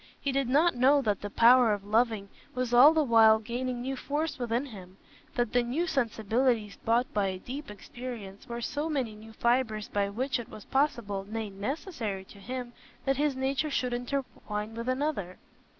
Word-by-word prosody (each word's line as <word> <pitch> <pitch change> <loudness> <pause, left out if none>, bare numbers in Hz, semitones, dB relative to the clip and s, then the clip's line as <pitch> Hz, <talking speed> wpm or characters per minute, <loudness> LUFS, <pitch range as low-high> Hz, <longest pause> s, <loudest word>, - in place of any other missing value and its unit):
He 280 - -1
did 270 -2 0
not 315 +6 +4
know 265 +4 +4
that 210 -4 0
the 205 - -4
power 235 +1 +6
of 205 -1 -4
loving 215 -1 +1 0.3
was 250 -1 -2
all 255 +5 +9
the 320 -1 +2
while 225 -4 +6
gaining 245 +2 -3
new 270 +1 -2
force 295 +3 -3
within 240 +2 -1
him; 190 -7 -11 0.4
that 240 -2 0
the 245 - +4
new 255 +9 -1
sensibilities 230 - 0
bought 235 +3 +1
by 205 -2 +1
a 190 -1 -3
deep 265 +8 -7
experience 210 -1 -8
were 235 0 -4
so 295 +6 -2
many 260 -8 -1
new 215 +1 -12
fibres 235 -2 0
by 200 -1 0
which 245 +5 -1
it 235 - -8
was 215 -2 -11
possible, 225 -8 0
nay, 220 -1 -4
necessary 210 - -4
to 200 - -15
him, 245 +3 -6 0.3
that 270 -1 +1
his 290 -1 +1
nature 270 +3 0
should 250 -3 -1
intertwine 240 -4 -4
with 230 +2 -4
another. 255 - -2
240 Hz, 180 wpm, -29 LUFS, 215-265 Hz, 0.4 s, all